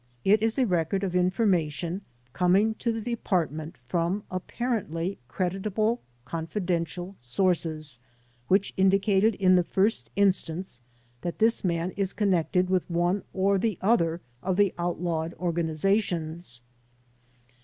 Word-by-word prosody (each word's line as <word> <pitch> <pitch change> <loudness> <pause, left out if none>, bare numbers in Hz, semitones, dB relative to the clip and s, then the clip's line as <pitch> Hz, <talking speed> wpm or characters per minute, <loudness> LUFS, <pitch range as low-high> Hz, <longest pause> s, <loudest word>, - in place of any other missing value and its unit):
It 210 +2 +5
is 225 +2 +1
a 260 - +4
record 180 0 0
of 185 -2 -2
information 180 -2 +1 0.3
coming 195 +5 +3
to 235 - 0
the 225 0 -3
Department 175 -8 -2
from 180 +4 0
apparently 185 -3 -2
credit 185 - -2
able 215 +4 +1 0.2
confidential 175 +3 -3
sources 155 -1 -1 0.5
which 195 +2 +2
indicated 195 +2 +3
in 185 -1 +4
the 180 -1 +5
first 200 +6 0
instance 185 -7 0 0.4
that 175 - -4
this 225 +1 +2
man 170 0 0
is 195 -1 -2
cpnnected 185 -3 +2
with 185 -1 0
one 175 +3 +1
or 195 +1 +2
the 215 -3 0
other 175 -6 +2 0.2
of 185 0 -1
the 200 -2 +4
outlawed 170 -1 -2
organizations. 170 - -1
185 Hz, 120 wpm, -27 LUFS, 170-200 Hz, 0.5 s, It